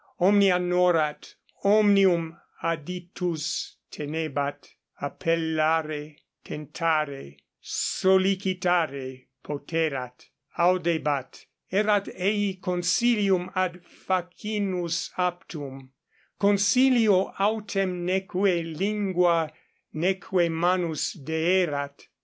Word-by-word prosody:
Omnia 195 0 +5
norat, 180 -4 +1 0.3
omnium 195 -5 +4 0.3
aditus 170 0 -3 0.2
tenebat; 145 -2 -4 0.3
appellare, 155 -1 -1 0.3
tentare, 150 - -2 0.2
sollicitare 180 -8 0 0.2
poterat, 140 -4 -3 0.3
audebat; 170 -6 0 0.3
erat 205 +1 +2
ei 200 +1 0
consilium 185 +1 +1
ad 180 -1 -1
facinus 180 -2 -3
aptum, 150 -7 -4 0.5
consilio 205 0 +4
autem 195 -3 -1
neque 185 -1 +1
lingua 180 -3 +1 0.4
neque 180 +1 +1
manus 170 -1 0
deerat. 160 -2 -1
175 Hz, 60 wpm, -26 LUFS, 155-190 Hz, 0.5 s, Omnia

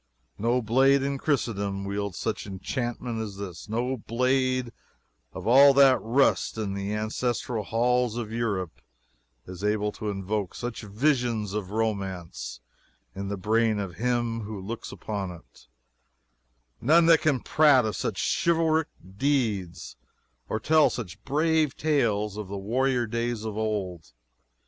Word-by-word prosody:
No 120 +3 +1
blade 135 +5 +4
in 140 0 -2
Christendom 100 -9 -1
wields 100 -1 -3
such 110 -2 -3
enchantment 120 +3 -3
as 100 -3 -6
this 100 -1 -8
no 125 +4 -1
blade 130 +2 0 0.6
of - - -8
all 135 +4 +7
that 135 -2 +6
rust 120 0 +2
in 105 -3 -2
the 100 +1 -3
ancestral 110 +2 -2
halls 120 +1 +1
of 115 -3 -4
Europe 100 -7 -2 0.6
is 90 +1 -9
able 105 0 +1
to 105 - -5
invoke 100 0 -3
such 120 -1 -5
visions 115 -2 0
of 105 -3 -3
romance 95 - -3 0.5
in 100 0 -5
the 100 0 -3
brain 110 +3 +2
of 95 -5 -5
him 120 0 0
who 105 -1 -6
looks 110 +5 -6
upon 100 -3 -4
it 80 -9 -14 1.1
none 165 +5 +5
that 165 -1 +6
can 145 -5 +2
prate 145 -3 +4
of 110 - -2
such - - -3 0.3
chivalric 160 -2 +2 0.3
deeds 105 - -1 0.5
or 110 - -1
tell 155 +6 +4
such 105 -8 -7
brave 155 0 +1
tales 110 -9 +1
of 105 -2 -5
the 100 +1 -5
warrior 120 +5 0
days 115 0 -2
of 110 -2 -4
old. 100 - -3
110 Hz, 140 wpm, -27 LUFS, 100-130 Hz, 1.1 s, all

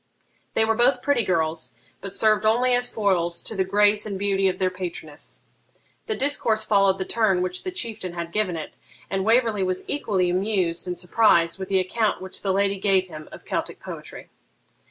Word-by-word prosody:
They 220 - +4
were 225 - +2
both 245 +2 +2
pretty 285 -5 +2
girls, 160 - -1 0.3
but 195 - -6
served 215 0 +2
only 240 +4 +3
as 245 0 +3
foils 175 -5 0
to 220 - -5
the 190 - +1
grace 205 +2 +3
and 200 -2 -3
beauty 195 0 +1
of 185 -1 -1
their 185 -1 0
patroness. 175 -5 -6 0.7
The 435 - -1
discourse 230 -6 +1
followed 195 -2 +3
the 190 - -3
turn 195 -5 +1
which 185 0 -3
the - - -3
Chieftain 225 - -5
had 170 -1 -5
given 195 -4 0
it, 155 - -8 0.3
and 195 0 0
Waverley 225 -1 +2
was 185 0 -1
equally 195 -11 0
amused 185 -3 0
and 180 0 -3
surprised 180 -3 +3
with 190 - -6
the 190 -1 +3
account 210 +4 0
which 190 0 -8
the 195 - 0
lady 200 0 +1
gave 190 -2 +2
him 155 -2 -10
of - - -12
Celtic - - -3
poetry. - - -10
195 Hz, 190 wpm, -24 LUFS, 185-220 Hz, 0.7 s, They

